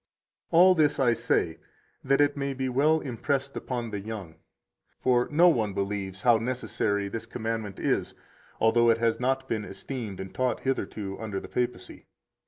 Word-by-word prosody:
140 -, -, +1 dB
All 185 Hz, -, +7 dB
this 155 Hz, -5 st, +2 dB
I 125 Hz, -3 st, +4 dB
say 115 Hz, -8 st, 0 dB, 0.4 s
that 135 Hz, +1 st, +2 dB
it 145 Hz, 0 st, +3 dB
may 140 Hz, -1 st, -2 dB
be 130 Hz, 0 st, -2 dB
well 150 Hz, +5 st, +3 dB
impressed 140 Hz, +2 st, -2 dB
upon 120 Hz, -3 st, -4 dB
the 105 Hz, -, -3 dB
young. 100 Hz, -5 st, -7 dB, 0.7 s
For 125 Hz, -1 st, +2 dB
no 165 Hz, +4 st, +5 dB
one 110 Hz, -, +2 dB
believes 100 Hz, -1 st, -3 dB
how 120 Hz, -2 st, +6 dB
necessary 110 Hz, -4 st, -1 dB
this 115 Hz, +3 st, -5 dB
commandment 110 Hz, -3 st, -4 dB
is, -, -, -1 dB, 0.4 s
although 115 Hz, +1 st, +4 dB
it 115 Hz, -, +4 dB
has 115 Hz, -1 st, +1 dB
not 130 Hz, +1 st, 0 dB
been 110 Hz, -4 st, -2 dB
esteemed 105 Hz, 0 st, -6 dB
and 95 Hz, 0 st, -7 dB
taught 130 Hz, -1 st, -1 dB
hitherto 105 Hz, -7 st, -3 dB
under 105 Hz, -3 st, -4 dB
the -, -, -10 dB
papacy. 125 Hz, 0 st, -4 dB
115 Hz, 170 wpm, -27 LUFS, 105-135 Hz, 0.7 s, All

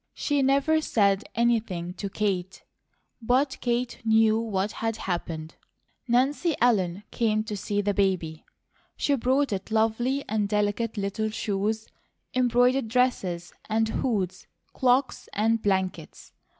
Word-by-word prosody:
She 290 Hz, -1 st, 0 dB
never 280 Hz, +4 st, +3 dB
said 200 Hz, -7 st, +2 dB
anything 215 Hz, -7 st, 0 dB
to 200 Hz, +1 st, -5 dB
Kate, 190 Hz, -2 st, -2 dB, 0.6 s
but 260 Hz, +4 st, +1 dB
Kate 240 Hz, 0 st, -1 dB
knew 220 Hz, 0 st, +4 dB
what 205 Hz, -3 st, -1 dB
had 225 Hz, 0 st, -2 dB
happened. 165 Hz, -5 st, -4 dB, 0.5 s
Nancy 275 Hz, +7 st, +2 dB
Ellen 200 Hz, -6 st, +2 dB
came 215 Hz, -2 st, +1 dB
to 220 Hz, -1 st, -5 dB
see 205 Hz, +1 st, -1 dB
the 205 Hz, 0 st, 0 dB
baby. 185 Hz, -6 st, 0 dB, 0.5 s
She 285 Hz, -, +1 dB
brought 265 Hz, 0 st, +1 dB
it 190 Hz, +1 st, -4 dB
lovely 225 Hz, +5 st, +1 dB
and 210 Hz, -2 st, 0 dB
delicate 210 Hz, +2 st, 0 dB
little 205 Hz, +2 st, -1 dB
shoes, 215 Hz, +1 st, -2 dB, 0.5 s
embroidered 250 Hz, 0 st, +3 dB
dresses 200 Hz, -8 st, 0 dB, 0.2 s
and 220 Hz, 0 st, +1 dB
hoods, 195 Hz, -6 st, -2 dB, 0.3 s
cloaks 255 Hz, +1 st, +1 dB
and 225 Hz, +2 st, +1 dB
blankets. 190 Hz, -3 st, -2 dB
220 Hz, 125 wpm, -26 LUFS, 195-245 Hz, 0.6 s, knew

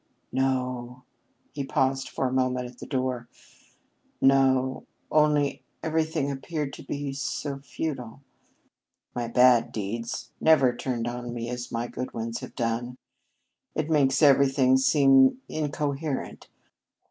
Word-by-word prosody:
"No." 125 Hz, -1 st, -1 dB, 0.5 s
He 145 Hz, -, -3 dB
paused 135 Hz, 0 st, 0 dB
for -, -, -2 dB
a 130 Hz, -, -1 dB
moment 125 Hz, -1 st, 0 dB
at 125 Hz, 0 st, -14 dB
the -, -, -8 dB
door. 130 Hz, -3 st, -2 dB, 0.9 s
"No 130 Hz, -1 st, +3 dB, 0.2 s
only 150 Hz, -2 st, +2 dB, 0.2 s
everything 160 Hz, -2 st, 0 dB
appeared 145 Hz, +1 st, -4 dB
to -, -, -9 dB
be 140 Hz, -1 st, -4 dB
so 140 Hz, +1 st, -3 dB
futile. 140 Hz, -3 st, -5 dB, 0.9 s
My 120 Hz, -1 st, -3 dB
bad 120 Hz, 0 st, +5 dB
deeds 115 Hz, +3 st, -4 dB
never 135 Hz, -6 st, +5 dB
turned 120 Hz, -2 st, -3 dB
on 120 Hz, 0 st, -5 dB
me 120 Hz, 0 st, -4 dB
as 125 Hz, 0 st, -5 dB
my 115 Hz, 0 st, -2 dB
good 125 Hz, +1 st, -6 dB
ones 115 Hz, 0 st, -3 dB
have -, -, -10 dB
done. 120 Hz, +2 st, -2 dB, 0.8 s
It 155 Hz, +1 st, -1 dB
makes 140 Hz, -1 st, +3 dB
everything 135 Hz, -2 st, +5 dB
seem 135 Hz, -, +5 dB
incoherent. 150 Hz, -1 st, -3 dB
130 Hz, 125 wpm, -26 LUFS, 125-140 Hz, 0.9 s, bad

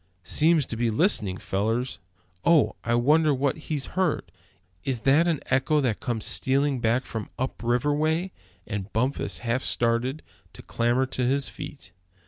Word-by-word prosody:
"Seems 155 Hz, -, +3 dB
to -, -, -5 dB
be 115 Hz, +1 st, 0 dB
listening, 105 Hz, -, +1 dB
fellers! 115 Hz, +8 st, -2 dB, 0.4 s
Oh! 165 Hz, -4 st, +4 dB
I 120 Hz, -, +1 dB
wonder 150 Hz, +5 st, +4 dB
what 135 Hz, +2 st, 0 dB
he's 150 Hz, -4 st, -1 dB
heard? 185 Hz, -4 st, 0 dB, 0.5 s
Is 125 Hz, -4 st, -2 dB
that 145 Hz, +7 st, +4 dB
an 165 Hz, -4 st, 0 dB
echo 135 Hz, +3 st, +3 dB
that 125 Hz, -7 st, 0 dB
comes 120 Hz, -6 st, -3 dB
stealing 135 Hz, 0 st, +1 dB
back 120 Hz, +3 st, +1 dB
from 110 Hz, -3 st, -5 dB
up 130 Hz, +1 st, -3 dB
river 120 Hz, +5 st, +1 dB
way?" 160 Hz, +5 st, 0 dB, 0.3 s
and 100 Hz, -2 st, -5 dB
Bumpus 130 Hz, +5 st, 0 dB
half 120 Hz, +3 st, 0 dB
started 120 Hz, +6 st, 0 dB, 0.3 s
to -, -, -12 dB
clamber 120 Hz, +3 st, +1 dB
to 130 Hz, -1 st, -3 dB
his 135 Hz, +2 st, +1 dB
feet. 145 Hz, -10 st, -9 dB
130 Hz, 155 wpm, -26 LUFS, 115-150 Hz, 0.5 s, Oh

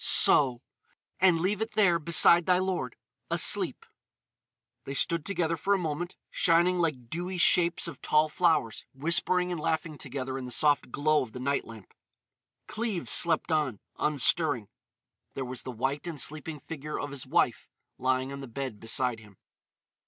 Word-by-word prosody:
So! 130 Hz, -3 st, +4 dB, 0.6 s
And 180 Hz, -3 st, +4 dB
leave 195 Hz, +5 st, -1 dB
it 220 Hz, +1 st, -3 dB
there 180 Hz, -6 st, +3 dB
beside 170 Hz, +1 st, +5 dB
thy 180 Hz, -1 st, +4 dB
lord, 180 Hz, -10 st, -3 dB, 0.3 s
asleep." -, -, +2 dB, 1.0 s
They 135 Hz, -, -6 dB
stood 170 Hz, +2 st, +1 dB
together 170 Hz, -4 st, -1 dB
for 200 Hz, +5 st, 0 dB
a -, -, 0 dB
moment, 175 Hz, +1 st, -4 dB, 0.2 s
shining 175 Hz, +2 st, +2 dB
like 130 Hz, -8 st, -2 dB
dewy 180 Hz, +3 st, -4 dB
shapes 175 Hz, 0 st, +4 dB
of 160 Hz, -6 st, -9 dB
tall 155 Hz, 0 st, +2 dB
flowers, 155 Hz, -, 0 dB
whispering 175 Hz, +5 st, +1 dB
and 175 Hz, -, -3 dB
laughing 155 Hz, 0 st, -2 dB
together 135 Hz, -1 st, -5 dB
in 130 Hz, -, -7 dB
the -, -, -7 dB
soft 145 Hz, +3 st, +1 dB
glow 155 Hz, +3 st, +1 dB
of 120 Hz, -4 st, -7 dB
the 125 Hz, -, -7 dB
night 140 Hz, +2 st, -1 dB
lamp. 110 Hz, -4 st, -13 dB, 0.7 s
Cleves 215 Hz, -5 st, -3 dB
slept 165 Hz, -1 st, +4 dB
on, 145 Hz, -9 st, 0 dB, 0.2 s
unstirring. 145 Hz, -, +2 dB, 0.7 s
There 135 Hz, -, -4 dB
was 125 Hz, 0 st, -4 dB
the 130 Hz, -, -7 dB
white 135 Hz, +7 st, -3 dB
and 160 Hz, -4 st, -6 dB
sleeping 155 Hz, +1 st, -1 dB
figure 150 Hz, +1 st, -7 dB
of 145 Hz, -, -5 dB
his 140 Hz, -2 st, -7 dB
wife -, -, 0 dB, 0.3 s
lying 130 Hz, +1 st, -1 dB
on 140 Hz, -, -7 dB
the 135 Hz, -, -8 dB
bed 125 Hz, -2 st, -6 dB
beside 120 Hz, +1 st, -1 dB
him. 105 Hz, -3 st, -18 dB
150 Hz, 160 wpm, -28 LUFS, 130-175 Hz, 1.0 s, beside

